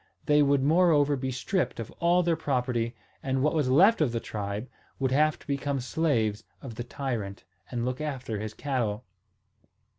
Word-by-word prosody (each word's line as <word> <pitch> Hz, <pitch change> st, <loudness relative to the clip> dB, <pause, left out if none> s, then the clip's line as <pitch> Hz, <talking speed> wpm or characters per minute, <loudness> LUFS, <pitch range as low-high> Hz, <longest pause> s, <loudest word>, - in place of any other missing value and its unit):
They 150 Hz, 0 st, +4 dB
would 140 Hz, -1 st, +3 dB
moreover 150 Hz, -2 st, +4 dB
be 130 Hz, 0 st, -3 dB
stripped 130 Hz, +8 st, -1 dB
of 115 Hz, -, -6 dB
all 175 Hz, +1 st, +3 dB
their 170 Hz, -1 st, +2 dB
property, 125 Hz, -6 st, -1 dB, 0.3 s
and 135 Hz, 0 st, 0 dB
what 150 Hz, -, +2 dB
was 150 Hz, -5 st, +1 dB
left 185 Hz, -, +5 dB
of 145 Hz, -6 st, +2 dB
the 115 Hz, -, -1 dB
tribe 105 Hz, +2 st, -4 dB, 0.3 s
would 130 Hz, -1 st, 0 dB
have 150 Hz, +3 st, +3 dB
to -, -, -19 dB
become 140 Hz, -1 st, -1 dB
slaves 125 Hz, -7 st, 0 dB, 0.2 s
of 125 Hz, -4 st, -8 dB
the 120 Hz, -, -5 dB
tyrant, 120 Hz, -6 st, -4 dB, 0.3 s
and 120 Hz, -1 st, -2 dB
look 125 Hz, +3 st, -3 dB
after 130 Hz, -8 st, -3 dB
his 110 Hz, 0 st, -5 dB
cattle. 120 Hz, -6 st, -2 dB
130 Hz, 175 wpm, -28 LUFS, 120-150 Hz, 0.3 s, left